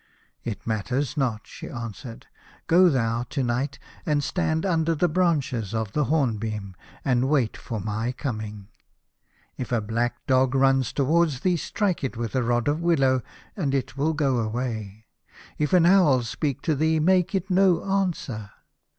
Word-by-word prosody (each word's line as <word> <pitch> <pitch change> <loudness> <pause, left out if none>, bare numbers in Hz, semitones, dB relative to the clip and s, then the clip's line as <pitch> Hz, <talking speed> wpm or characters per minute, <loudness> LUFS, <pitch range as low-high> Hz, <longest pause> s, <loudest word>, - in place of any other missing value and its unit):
" - - -42
It 100 - -9
matters 125 +7 -1
not," 125 -7 -1
she - - -9
answered. 115 0 -7 0.2
" - - -27
Go 180 +2 +6
thou 115 -5 0
to 140 - -1
night, 125 +4 -1 0.3
and 150 -2 +1
stand 160 0 0
under 165 -3 +1
the 175 +4 +2
branches 145 - 0
of 110 -2 -2
the 150 +5 +1
hornbeam, 110 - -1 0.3
and 130 -1 +2
wait 135 -7 +1
for 115 -4 -5
my 110 +4 -2
coming. 110 -7 -5 0.9
If 125 - -5
a 120 - +2
black 115 +3 -2
dog 130 0 +3
run 135 0 +4
towards 145 +3 +1
thee, 180 +1 +2
strike 185 +1 -1
it 130 -3 -3
with 115 +2 -4
a 130 - +2
rod 120 +1 0
of 150 +3 +1
willow, 135 -7 +3 0.3
and 145 -8 -1
it 135 0 -2
will 150 +3 +1
go 135 -5 +1
away. 110 -2 -4 0.5
If 150 -1 0
an 180 -2 +5
owl 170 -9 +5
speak 140 +4 -3
to 160 - +1
thee, 160 +2 +2
make 185 +3 +2
it 190 0 -2
no 185 -2 +4
answer. 175 - -2
135 Hz, 165 wpm, -25 LUFS, 115-160 Hz, 0.9 s, Go